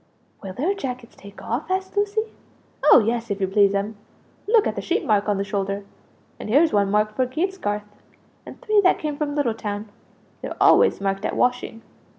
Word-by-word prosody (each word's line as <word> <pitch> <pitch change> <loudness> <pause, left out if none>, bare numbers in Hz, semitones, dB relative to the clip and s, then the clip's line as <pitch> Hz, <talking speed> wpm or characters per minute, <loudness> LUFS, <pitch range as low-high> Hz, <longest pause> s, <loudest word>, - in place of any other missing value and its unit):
"Will 190 -2 -7
their 315 - 0
jackets 250 -10 -6
take 200 0 -13
off?" 275 +9 -3
asked 380 +1 -2
Lucie. 415 +2 -1 0.5
"Oh 245 - +7
yes, 235 0 -1
if 200 0 -2
you 190 - 0
please'm; 200 +1 +1 0.5
look 440 -1 +4
at - - -1
the - - -3
sheep 365 +4 -1
mark 210 -1 +2
on 205 - +1
the 195 - -1
shoulder. 200 0 -3 0.5
And - - -7
here's 300 +8 +4
one 200 -1 +2
marked 210 +1 +1
for 255 +2 +1
Gatesgarth, 310 - -2 0.6
and - - -12
three 425 -1 +3
that 365 - +4
come 300 -1 -3
from 290 0 -3
Little 280 -6 +1
town. 210 -1 -5 0.5
They're - - -6
always - - +5
marked 195 0 -1
at - - -2
washing!" 245 -2 -1
230 Hz, 185 wpm, -23 LUFS, 205-315 Hz, 0.6 s, Oh